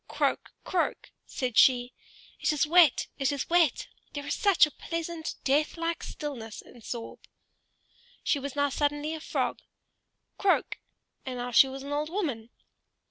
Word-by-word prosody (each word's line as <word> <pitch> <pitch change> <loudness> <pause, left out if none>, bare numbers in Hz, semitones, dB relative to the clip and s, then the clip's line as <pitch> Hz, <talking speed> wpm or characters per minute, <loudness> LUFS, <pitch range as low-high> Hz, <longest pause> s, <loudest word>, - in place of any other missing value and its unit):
"Croak! - - -1
croak!" 355 -2 -1 0.2
said 250 -4 0
she. 245 -1 +5 0.5
"It - - +1
is 300 -1 +2
wet, 330 -3 +5
it 275 0 +1
is 280 -2 -3
wet; 340 -6 +3 0.3
there 285 -1 -5
is 285 - -1
such 400 -6 +5
a 300 - -8
pleasant 330 +1 -5
deathlike 325 +4 0
stillness 240 -8 -6
in 240 - -16
Sorbe!" 230 +1 -7 1.0
She 285 - +1
was 280 0 -6
now 285 0 +2
suddenly 295 +2 -1
a 320 - -5
frog, - - -2 0.8
"Croak"; 390 -2 +1 0.4
and 255 -1 -5
now 245 0 -4
she 270 - +7
was 265 0 -7
an 280 - -7
old 300 +1 -1
woman. 285 - -3
290 Hz, 150 wpm, -28 LUFS, 260-325 Hz, 1.0 s, she